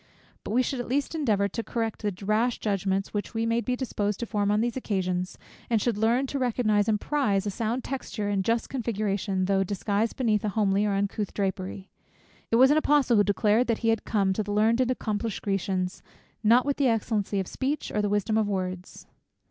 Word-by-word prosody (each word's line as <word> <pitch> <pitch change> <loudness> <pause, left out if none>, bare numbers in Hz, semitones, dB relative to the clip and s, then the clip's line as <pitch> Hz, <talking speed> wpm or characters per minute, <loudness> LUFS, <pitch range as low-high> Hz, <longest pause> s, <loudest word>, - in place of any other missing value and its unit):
But - - -7
we 245 +4 +3
should 260 +1 -3
at 245 - -4
least 275 +5 -1
endeavour 215 -11 +1
to 230 +4 -4
correct 225 -2 -3
the 200 -2 -4
rash 225 +4 +1
judgments 195 -1 -1
which 205 +2 -4
we 225 0 0
may 230 +1 +1
be 250 +1 -1
disposed 210 -5 -2
to - - -1
form 205 -2 0
on 210 +1 +2
these 235 +1 0
occasions, 185 -6 -2 0.3
and 230 -2 +3
should 235 +1 0
learn 230 +5 +2
to 275 +1 -3
recognize 225 -4 +1
and 210 -1 +2
to - - -13
prize 215 -10 +1
a 205 - -1
sound 230 +4 -2
texture 240 -5 -4
and 200 -2 0
just 230 +3 0
configuration, 205 -6 -1
though 195 0 +2
disguised 205 +3 -1
beneath 220 -5 +1
a 210 - 0
homely 205 0 +1
or 205 - 0
uncouth 200 +1 -2
drapery. 190 -1 -3 0.6
It - - +2
was 260 +4 +6
an 300 - +4
Apostle 290 -6 +3
who 205 - +6
declared 210 +4 +2
that 230 -2 +1
he - - +4
had 225 -1 +1
come 195 -3 +1
(to 215 - -1
the 205 -1 -4
learned 225 +4 +3
and 255 - +1
accomplished 220 -3 -2
Grecians 190 -2 -1
too) - - -34 0.4
"not 245 +4 +6
with 285 0 -1
excellency 220 -5 +1
of 190 - -1
speech, 275 +3 -3
or 210 - 0
the 205 - 0
wisdom 205 +2 +1
of 215 - +1
words." 185 -2 -4
215 Hz, 215 wpm, -27 LUFS, 200-235 Hz, 0.6 s, was